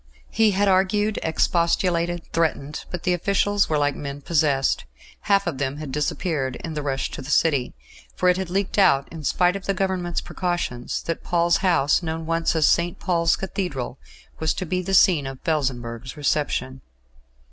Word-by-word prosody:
He 220 0 +4
had 200 +1 +1
argued, 195 +3 +2
expostulated, 170 +1 +1
threatened, 155 -3 -1
but 180 - -5
the 180 - +2
officials 200 +3 +1
were 155 - +1
like 145 -1 +1
men 140 0 -6
possessed. 145 - +1 0.4
Half 200 0 +4
of 165 -7 -3
them 140 0 -2
had 150 -3 -6
disappeared 145 -1 -1
in 165 - -4
the 150 - -3
rush 135 -2 -2
to - - -6
the 135 - -9
City, 145 - +2 0.4
for 180 - +1
it 180 - +5
had 190 -2 -3
leaked 195 +2 -1
out, 140 -8 +4
in 160 -2 -8
spite 180 +5 +2
of 195 - -6
the 195 - +1
Government's 185 -2 -1
precautions, 175 -9 -3
that 165 - -4
Paul's 170 0 +2
House, 170 -7 +2
known 160 -1 -4
once 165 +1 0
as 160 -2 +4
St. 170 0 +2
Paul's 170 -3 +1
Cathedral, 170 -10 -4 0.4
was 160 -1 0
to 185 - -3
be 180 +2 -1
the 195 +2 0
scene 160 -7 +5
of 135 -1 -7
Felsenburgh's 130 -4 -2
reception. 135 -3 -1
165 Hz, 175 wpm, -23 LUFS, 145-185 Hz, 0.4 s, it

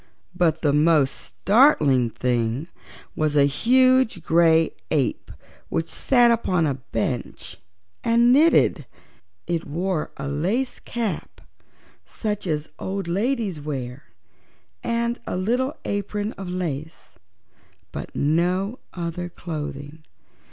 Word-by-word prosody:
But 170 -3 +1
the 145 -2 +3
most 150 -2 +4
startling 155 - +3
thing 120 +4 -1 0.5
was 155 -1 0
a 140 -1 +6
huge 255 - +3
gray 165 -1 +4 0.2
ape 145 -5 -1 0.4
which 165 - -1
sat 240 +5 +3
upon 185 -7 +1
a 145 - +1
bench 125 -2 -4 0.5
and 235 +1 +4
knitted. 315 +5 +4 0.6
It 170 -2 -2
wore 170 +2 -2
a 135 - -4
lace 190 - -1
cap, 235 -4 -4 0.7
such 210 -3 -4
as 150 -2 -2
old 195 -1 -3
ladies 205 - -1
wear, 135 -2 -5 0.8
and 235 +1 -1
a - - -2
little 245 +9 0
apron 205 +1 -2
of 195 -2 -7
lace, 160 -4 -5 0.8
but - - -7
no 180 - +1
other 175 0 -4
clothing. 150 -3 -7
170 Hz, 110 wpm, -23 LUFS, 150-220 Hz, 0.8 s, a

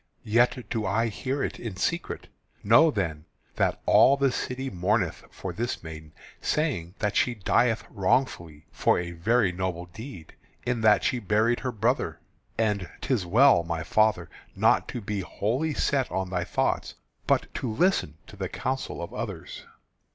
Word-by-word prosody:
Yet 120 +1 +2
do 110 - -1
I 110 +4 +1
hear 130 +6 -3
it - - -3
in 115 -5 -5
secret. 165 - -2 0.4
Know 115 +11 +6
then 85 - -2 0.3
that - - +1
all 140 - +6
the 140 -1 +2
city 130 +2 -3
mourneth 90 -1 0
for - - -6
this 120 -3 -3
maiden, 80 -1 -9 0.3
saying 115 - -1
that 105 -1 -1
she 125 - +2
dieth 115 +1 +2
wrongfully 90 - -1
for - - +2
a 85 0 -3
very 95 +4 +2
noble 90 -1 -3
deed, 90 - -10 0.3
in 120 -2 0
that 110 -1 +5
she 125 - +1
buried 110 +3 +2
her 130 - -2
brother. 115 +4 0 0.4
And 105 -5 0
'tis 110 -10 0
well, 115 0 +6
my 85 -1 -3
father, 105 -2 +2 0.3
not - - +3
to 120 - -5
be 105 0 -3
wholly 120 - -1
set 135 -3 +1
on 95 -1 -2
thy 90 -2 -1
thoughts, - - -1 0.3
but - - +1
to 125 -4 -3
listen 135 - +1
to - - -13
the 95 -2 -4
counsels 125 +2 -3
of 85 - -6
others." - - -6
105 Hz, 160 wpm, -27 LUFS, 90-125 Hz, 0.4 s, Know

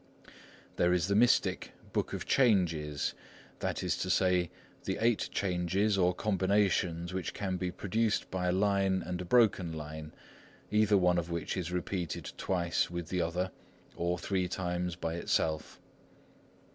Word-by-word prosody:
There 90 0 +3
is 90 +1 +1
the 100 - +2
mystic 120 +3 +3 0.2
Book - - 0
of - - -4
Changes, 85 - +2 0.5
that - - -2
is - - +1
to - - -3
say, 90 -2 +3 0.4
the - - -1
eight 115 -1 +2
changes 95 +2 +1
or 90 -2 +2
combinations 95 -4 +1
which 95 -2 -3
can 95 -2 -2
be 90 0 -2
produced 110 +4 -1
by 90 -1 -1
a - - +3
line 95 -1 +2
and 90 +1 -3
a - - -5
broken 95 -6 +3
line, 75 0 -7 0.6
either 105 -1 +4
one 90 -1 +3
of 85 0 -4
which 85 -1 -3
is 90 -2 -3
repeated 90 -1 -3
twice 85 -2 0
with 85 -1 -5
the 90 -1 0
other, 90 +3 -1 0.4
or 85 +1 -1
three 90 0 -1
times 90 -1 -2
by 85 -2 -3
itself. 80 -2 -1
90 Hz, 150 wpm, -31 LUFS, 85-100 Hz, 0.6 s, either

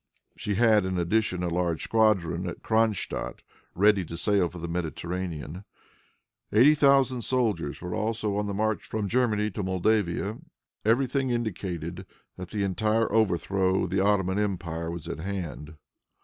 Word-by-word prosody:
She 105 - -3
had, 110 -1 +4
in 95 -1 -2
addition, 90 +1 0
a - - 0
large 85 -1 -1
squadron 95 -6 +2
at 85 - -9
Cronstadt, 110 -2 0 0.3
ready 100 +1 +4
to 85 +1 -7
sail 100 0 +2
for 90 - -10
the 85 0 -5
Mediterranean. 85 0 -4 0.9
Eighty 125 +8 +6
thousand 135 -4 +4
soldiers 105 - -1
were 90 0 -4
also 110 -1 -1
on 105 0 -1
the 100 - -3
march 110 +1 0
from 110 -2 -3
Germany 105 -2 +1
to 105 - -4
Moldavia. 100 +2 0 0.4
Every 115 +5 +3
thing 130 +1 -1
indicated 95 -6 -3 0.3
that 90 -1 -8
the 105 -2 -2
entire 110 +4 +1
overthrow 95 -2 +2
of - - -3
the 95 - +1
Ottoman 95 -1 +2
empire 85 -5 -2
was 85 -1 -6
at - - -5
hand. 80 -4 -5
100 Hz, 150 wpm, -27 LUFS, 90-110 Hz, 0.9 s, Eighty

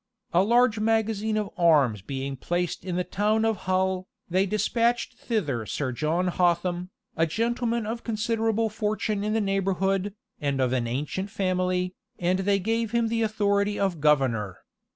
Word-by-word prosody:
A 175 - +5
large 235 +2 +3
magazine 220 -1 +1
of 210 -2 -2
arms 145 - +4
being 135 +5 -4
placed 175 +6 -2
in 180 -1 -3
the 180 - +1
town 215 +4 +1
of 225 -1 +2
Hull, 185 0 +1 0.2
they 185 +3 +2
despatched 235 +4 +1
thither 160 - -2
Sir 135 -3 -2
John 160 +8 0
Hotham, 175 0 +1 0.3
a 165 0 +2
gentleman 235 +4 -1
of 230 +2 -4
considerable 225 0 0
fortune 215 -1 -1
in 215 +1 0
the 225 - +2
neighborhood, 195 0 0 0.2
and 140 -2 -1
of 130 -1 +1
an 120 -2 0
ancient 150 +11 -3
family, 185 -1 0 0.2
and 180 +2 +1
they 200 +1 +2
gave 225 +3 -1
him 235 -1 +2
the 230 0 0
authority 205 -1 +1
of 190 -6 0
governor. 125 - +2
195 Hz, 155 wpm, -26 LUFS, 170-220 Hz, 0.3 s, A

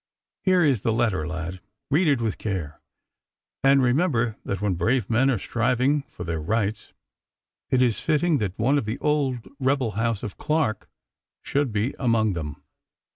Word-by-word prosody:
Here 185 -2 +3
is 135 -9 +2
the 115 - +1
letter, 110 -9 0
lad. 85 +2 -5 0.3
Read 160 +5 +3
it 140 -5 +3
with 110 -3 -2
care, 90 -8 -4 0.8
and 135 0 +5
remember 125 - +2
that 100 - -3
when 100 -1 0
brave 110 +6 0
men 125 +4 +3
are 130 - +2
striving 125 +7 +1
for 90 - -9
their 80 -2 -3
rights 105 +5 -1 0.8
it 130 -1 +3
is 120 -4 +1
fitting 155 -1 +2
that 100 -4 -3
one 135 +6 +2
of 120 - -5
the 110 +4 -3
old 135 -7 0
rebel 130 -3 +1
house 115 0 -1
of 105 -5 -6
Clarke 150 -8 -1 0.5
should 140 -3 0
be 105 +5 -1
among 115 -5 +2
them. 75 -3 -6
115 Hz, 165 wpm, -25 LUFS, 105-135 Hz, 0.8 s, and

